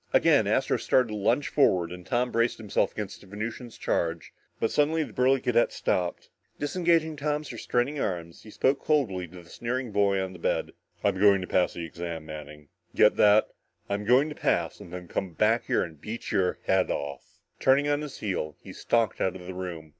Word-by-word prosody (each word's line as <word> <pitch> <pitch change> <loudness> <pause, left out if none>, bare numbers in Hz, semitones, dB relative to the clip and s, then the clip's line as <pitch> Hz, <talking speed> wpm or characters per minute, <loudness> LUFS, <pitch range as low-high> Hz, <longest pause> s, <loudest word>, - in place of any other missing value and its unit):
Again, - - +4
Astro - - +2
started 125 -3 +2
to 105 - -4
lunge 115 +7 +1
forward 90 - +3
and 90 0 -8
Tom 125 +4 0
braced 115 +1 +1
himself 105 -3 0
against 105 -2 -6
the 100 - -16
Venusian's 110 +4 -6
charge, 85 0 -2 0.3
but 115 - 0
suddenly 155 +2 +2
the - - -9
burly 130 +1 +3
cadet 125 -2 +2
stopped. 90 -1 -2 0.3
Disengaging 165 0 +1
Tom's 150 -1 -2
restraining 125 +5 -1
arms, 85 -6 -3
he 110 - -13
spoke 130 +5 +1
coldly 105 - +1
to 90 +1 -12
the 85 - -19
sneering 125 0 -3
boy 100 -1 +2
on 95 0 -3
the 90 - -11
bed. - - -1 0.3
"I'm 95 - +1
going 100 -1 +6
to 90 - -5
pass 90 -1 +1
the 85 - -4
exam, 85 -1 -6
Manning. 75 -1 -9 0.3
Get 105 - +5
that? 105 +1 +5 0.4
I'm 100 +1 -1
going 125 +7 +4
to - - -5
pass - - 0
and 85 - -11
then 90 -1 -7
come 90 +1 -3
back 110 +8 +1
and 80 -4 -1
beat 115 +2 -6
your 90 -2 +1
head 95 -1 +2
off!" 70 -2 -5 0.2
Turning 135 +2 +4
on 145 0 +1
his 150 -3 -8
heel, 85 -7 -2
he - - -11
stalked 115 -3 0
out 95 - +1
of 90 -1 -9
the 95 - -6
room. 90 -4 -6
105 Hz, 200 wpm, -27 LUFS, 90-125 Hz, 0.4 s, going